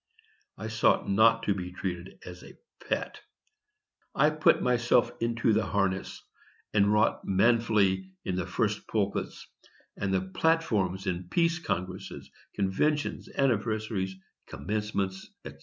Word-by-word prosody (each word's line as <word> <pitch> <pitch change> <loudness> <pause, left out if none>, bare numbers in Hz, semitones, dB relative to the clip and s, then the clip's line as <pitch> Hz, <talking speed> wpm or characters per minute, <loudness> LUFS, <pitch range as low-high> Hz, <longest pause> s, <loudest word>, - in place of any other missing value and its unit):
I 110 - -5
sought 110 0 +2
not 115 +3 +4
to 105 - +2
be 90 -2 -6
treated 90 0 -5
as 90 0 -9
a - - -14 0.3
pet. - - -2 0.9
I 150 - +4
put 155 0 +3
myself 120 -1 +3
into 115 -1 +1
the 110 +1 +1
harness, 100 -2 -1 0.5
and 100 -1 +4
wrought 105 0 +2
manfully 100 -2 +2 0.2
in 90 - -1
the 90 0 -2
first 105 +2 -1
pulpits, 100 -3 -2 0.5
and 100 -1 -2
the 95 -1 +2
platforms 95 - 0
in 90 -1 -3
peace 170 0 +2
congresses, 95 - -5 0.2
conventions, 145 +10 0
anniversaries, 110 -6 0 0.3
commencements, 100 +3 -3 0.2
&c. - - -7
100 Hz, 125 wpm, -28 LUFS, 95-115 Hz, 0.9 s, not